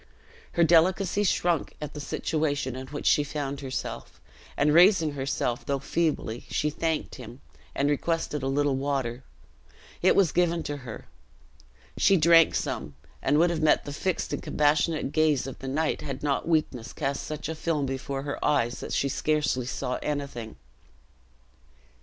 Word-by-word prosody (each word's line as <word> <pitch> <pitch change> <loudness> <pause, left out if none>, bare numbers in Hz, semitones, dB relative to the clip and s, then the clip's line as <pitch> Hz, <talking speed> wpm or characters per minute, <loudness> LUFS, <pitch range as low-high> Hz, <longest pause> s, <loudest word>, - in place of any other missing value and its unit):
Her 170 - +3
delicacy 180 +4 +3
shrunk 175 -5 0
at 150 -1 -6
the 150 - -7
situation 145 -3 -1
in 130 0 -7
which 145 +2 -7
she 145 - +4
found 145 -1 -4
herself; 130 -1 -5 0.4
and 150 +1 +3
raising 170 -2 +6
herself, 135 -3 -2
though 140 - -1
feebly, 140 -5 -1
she 150 - 0
thanked 160 +1 -2
him, 120 +2 -10 0.4
and 140 - +1
requested 150 0 -1
a 135 - -2
little 140 0 +1
water. 130 -3 -2 0.8
It 185 - +4
was 190 -6 +4
given 170 -2 +1
to 145 - -4
her. 125 -5 -9 0.9
She 195 - +5
drank 165 0 +6
some, 70 -1 -3 0.3
and 145 +2 +2
would 170 +2 +4
have 165 -2 -2
met 155 - +3
the 145 - -5
fixed 185 +4 -2
and - - -2
compassionate 150 0 +1
gaze 155 -4 +2
of 135 - -7
the 135 - -7
knight, 155 +4 -1
had 135 -2 -6
not 145 +1 0
weakness 140 -8 0
cast 140 -2 -2
such 155 -1 -5
a 160 - -3
film 155 -2 -1
before 135 +1 -4
her 140 0 -4
eyes 120 -5 +1
that - - -6
she 140 - +1
scarcely 145 -3 0
saw 125 0 -3
anything. 140 - -4
145 Hz, 160 wpm, -27 LUFS, 135-160 Hz, 0.9 s, raising